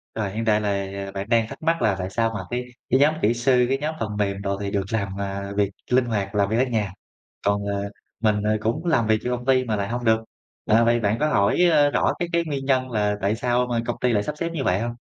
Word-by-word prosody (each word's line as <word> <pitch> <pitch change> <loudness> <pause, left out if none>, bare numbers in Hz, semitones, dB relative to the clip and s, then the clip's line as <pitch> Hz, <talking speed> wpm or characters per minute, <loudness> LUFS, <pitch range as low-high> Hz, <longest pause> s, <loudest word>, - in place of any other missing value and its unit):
Rồi, 100 -3 -2
hiện 115 +2 -3
tại 105 -1 +3
là 100 -1 -3
bạn 100 +3 -5
đang 115 -2 +3
thắc - - -10
mắc 165 0 +1
là 100 -3 +2
tại 90 +1 -3
sao 115 +2 0
mà 100 - -3
cái 125 +1 -2 0.2
cái 130 - +4
nhóm 150 +2 +5
kỹ 110 +3 +3
sư, 125 +1 +3
cái 135 - +2
nhóm 155 +2 -3
phần 105 -2 -3
mềm 100 -1 -1
đồ 100 0 -2
thì 100 0 -3
được 100 -2 0
làm, 100 -2 -2
à, 100 0 -4
việc 100 -1 +2 0.2
linh 125 0 +4
hoạt, 105 -3 -2
làm 100 -1 +2
việc 110 - 0
ở 130 - +4
nhà, 105 -6 -2 0.5
còn, 100 0 +1
ờ, 100 0 -2 0.3
mình, 105 -2 +2
ờ, 110 0 +2
cũng 150 +11 -2
làm 120 -10 +2
việc 110 0 +3
cho 125 0 0
công 120 +1 -10
ty 130 -1 +3
mà 110 -3 -1
lại 100 0 -2
hông 120 +1 -3
được. 110 0 +3 0.5
À, 115 +2 +4
vậy 120 0 +3
bạn 105 +1 +1
có 155 - +2
hỏi, 100 -3 +2
ơ, 145 -2 +4
rõ - - +2
cái 175 - -2
cái 170 0 +2
nguyên 140 -3 -3
nhân 130 -1 +1
là 105 -2 +1
tại 105 +3 +1
sao 125 +1 +1
mà 120 -1 0
công 120 - -2
ty 125 -1 +2
lại 105 -2 +2
sắp 150 - -4
xếp 170 0 -2
như 140 - -2
vậy 90 +3 +2
hông? 120 0 -2
110 Hz, 280 wpm, -23 LUFS, 100-125 Hz, 0.5 s, nhóm